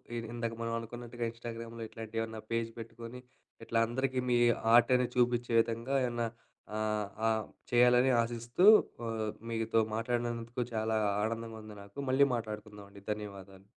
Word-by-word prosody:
ఇ 120 - -1
ఇందాక 115 -1 -2
మనం 115 0 -2
అనుకున్నట్టుగా 120 +1 -6
ఇన్‌స్టాగ్రామ్‌లో 115 0 -7
ఇట్లాంటి 115 0 -9
ఏమన్నా 110 -1 -5
పేజ్ 115 0 0
పెట్టుకొని, 115 +2 -8 0.5
ఇట్లా 115 0 +1
అందరికీ 130 +2 -1
మీ 120 - +5 0.4
ఆర్ట్ 120 +1 +7
అనేది 125 -1 +1
చూపించే 120 -1 +2
విధంగా 115 +4 -2
ఏమన్నా 120 -1 -1 0.5
ఆహ్, 105 -1 0 0.2
ఆహ్, 110 -1 +1 0.3
చేయాలని 125 +2 +5
ఆశిస్తూ 120 +8 0 0.4
ఆ! - - -2 0.4
మీతో 115 0 +1 0.2
మాట్లాడినందుకు 120 +1 -2
చాలా 110 0 0 0.3
ఆనందంగా 115 0 -3
ఉంది 110 -1 -10
నాకు. 100 +4 -17
మళ్ళీ 140 +2 +5
మాట్లాడుకుందాం 105 -2 -6
అండి. 100 -1 -14
ధన్యవాదాలు. 100 -2 -10
115 Hz, 140 wpm, -32 LUFS, 110-120 Hz, 0.5 s, ఆర్ట్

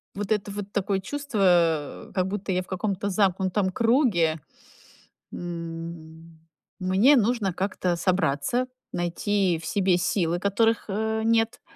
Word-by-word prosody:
вот 200 0 -4
это 205 -1 0
вот, 200 0 -6
такое 200 -1 0
чувство, 185 - 0
как 185 -1 0
будто 195 0 -3
я 185 0 0
в - - -20
каком-то 200 +1 -2
замкнутом 190 0 +1
круге. 225 - +2 0.9
М, 165 -1 -7 0.4
мне 190 +10 +4
нужно 220 -4 +1
как-то 185 -1 -1
собраться, 180 - 0 0.3
найти 175 +1 0
в - - -7
себе 185 +1 +2
силы, 175 -1 0
которых, 225 +4 +1
э, 220 +2 -1
нет, 225 0 +1
190 Hz, 125 wpm, -25 LUFS, 175-210 Hz, 0.9 s, мне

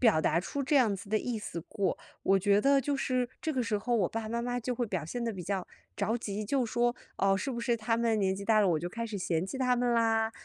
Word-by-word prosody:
表 220 -10 +5
达 160 +2 +2
出 280 +9 -3
这 295 +3 0
样 225 -6 +4
子 200 +1 -10
的 215 0 +2
意 235 -1 -3
思 170 -5 -5
过。 200 -3 -1 0.3
我 195 0 +4
觉 200 +1 +3
得 275 +2 +4
就 280 +2 -1
是 255 -2 0
这 315 - -1
个 255 -2 0
时 220 -3 0
候 240 +3 -1
我 195 -6 +2
爸 225 0 -3
爸 215 - -6
妈 235 +1 -2
妈 245 0 -1
就 250 +2 -2
会 240 - -1
表 185 -7 -3
现 240 +9 -4
得 230 -1 -1
比 185 -3 -6
较 190 0 -2 0.3
着 225 +2 0
急， 210 -2 -4
就 260 +3 +1
说， 240 +2 +1 0.2
哦， 195 0 +3
是 270 - -2
不 235 - -4
是 235 0 +1
他 225 +1 0
们 230 -1 +2
年 190 -1 +2
纪 200 +1 -6
大 215 -1 +4
了， 200 - +4
我 160 -3 +2
就 175 +2 -4
开 230 +5 -4
始 210 -2 -5
嫌 170 -1 0
弃 265 - -5
他 250 -1 +3
们 245 0 +1
啦？ 225 -1 +2
225 Hz, 310 characters per minute, -30 LUFS, 200-245 Hz, 0.3 s, 表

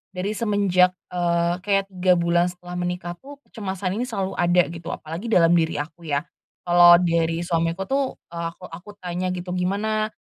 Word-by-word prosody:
dari 190 +3 -2
semenjak, 200 -4 +2 0.2
eee, 175 0 0
kayak 195 +1 0
3 185 -1 +3
bulan 170 0 +2
setelah 180 0 -7
menikah 175 0 -3
tuh 285 +2 -11
kecemasan 195 -1 -4
ini 250 - -2
selalu 195 -5 -3
ada 175 -1 +3
gitu, 165 0 -9
apalagi 165 +7 -6
dalam 170 -7 +4
diri 165 -2 +2
aku 160 +3 -6
ya. 145 -1 0 0.4
Kalau 175 0 +7
dari 170 -1 +1
suamiku 165 +1 -1
tuh, 270 +4 -1 0.2
eee 170 0 -4
aku 180 -1 -12
aku 175 +5 -10
tanya 180 +1 -2
gitu, 180 0 -6
"Gimana, 205 +4 0
180 Hz, 170 wpm, -23 LUFS, 170-195 Hz, 0.4 s, Kalau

